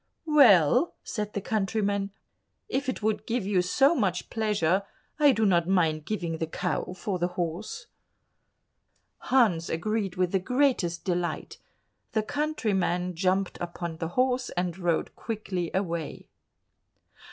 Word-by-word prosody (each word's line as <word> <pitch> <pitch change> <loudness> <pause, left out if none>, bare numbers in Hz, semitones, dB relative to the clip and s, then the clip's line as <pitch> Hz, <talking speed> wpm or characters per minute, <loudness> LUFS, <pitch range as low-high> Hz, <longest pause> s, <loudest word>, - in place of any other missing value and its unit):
"Well," 265 - +5
said 210 -1 -4
the 200 - -2
countryman, 200 -1 0 0.6
"if 265 +1 -1
it 255 - -4
would 215 0 -1
give 235 -3 -1
you 195 -2 +2
so 270 - +3
much 195 - -1
pleasure, 205 -5 +1 0.4
I 290 -2 +7
do 220 -4 +1
not 175 -4 +3
mind 160 -5 +2
giving 170 -5 -3
the 160 - -1
cow 170 - -2
for 190 -3 -3
the 175 - +1
horse." 185 - -3 1.3
Hans 210 -11 +2
agreed 200 +2 -1
with 180 -1 +1
the 195 - +2
greatest 250 -7 +1
delight; 175 -2 -2 0.5
the 220 - +1
countryman 200 - -1
jumped 185 +2 0
upon 170 -1 -5
the 165 - -3
horse, 255 0 +2
and 175 -1 -1
rode 175 -3 -1
quickly 195 -6 -3
away. 170 -5 -3
195 Hz, 130 wpm, -27 LUFS, 175-220 Hz, 1.3 s, I